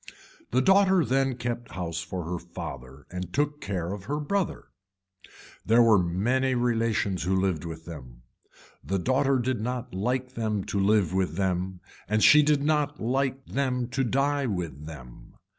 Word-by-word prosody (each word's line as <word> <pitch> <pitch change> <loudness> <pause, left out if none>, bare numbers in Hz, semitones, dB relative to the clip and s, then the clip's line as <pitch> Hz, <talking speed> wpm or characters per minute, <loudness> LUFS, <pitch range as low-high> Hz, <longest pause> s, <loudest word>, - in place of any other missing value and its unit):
The 130 +2 +2
daughter 190 -2 +5
then 135 0 +1
kept 120 -1 -4
house 85 -3 -3
for 90 +1 -5
her 90 +2 -4
father 75 -6 -9
and 90 -1 -5
took 150 +3 -1
care 90 -2 -3
of 100 -1 -8
her 145 +6 -2
brother. 190 +5 -2 0.9
There 115 +3 +5
were 110 -4 +5
many 120 +10 +1
relations 115 -5 0
who 95 +2 +1
lived 95 -5 -1
with 80 -1 -7
them. 65 -8 -10 0.6
The 95 - -1
daughter 130 +7 +2
did 125 -2 -1
not 125 -1 -4
like 125 +6 -1
them 110 -4 -1
to 100 - -2
live 100 -3 +3
with 95 -4 0
them 95 -1 -1 0.3
and 105 +1 +1
she 150 - +8
did 145 -1 +2
not 150 -1 +1
like 130 +3 -1
them 125 -3 -1
to 135 +2 0
die 140 +2 +1
with 85 - -4
them. 60 -6 -11
110 Hz, 160 wpm, -27 LUFS, 90-130 Hz, 0.9 s, she